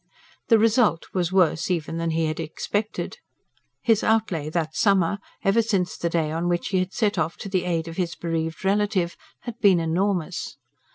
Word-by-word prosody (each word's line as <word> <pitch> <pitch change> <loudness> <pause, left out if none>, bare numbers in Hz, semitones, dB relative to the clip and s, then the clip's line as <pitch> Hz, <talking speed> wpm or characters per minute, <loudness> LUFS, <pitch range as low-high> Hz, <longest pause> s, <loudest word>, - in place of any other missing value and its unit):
The 225 - +6
result 220 -5 +3
was 180 -2 0
worse 175 -3 +2
even 165 -2 -1
than 165 0 -1
he 160 0 +1
had 155 0 -2
expected. 205 - -3 0.6
His 225 -3 +3
outlay 205 -9 +1
that 160 -1 -2
summer 200 -2 +2 0.2
ever 210 +3 +4
since 195 -5 0
the 170 - -2
day 160 -2 0
on 165 +2 -1
which 175 0 -1
he 190 - +1
had 185 +1 -1
set 210 -4 0
off 160 +1 -1
to 200 - -7
the 185 -2 0
aid 170 -2 -1
of 165 - -8
his 175 -2 -1
bereaved 165 +1 -3
relative 195 -3 +1 0.3
had 240 -1 -7
been 195 -6 +5
enormous. 175 +1 -1
180 Hz, 180 wpm, -24 LUFS, 165-205 Hz, 0.6 s, The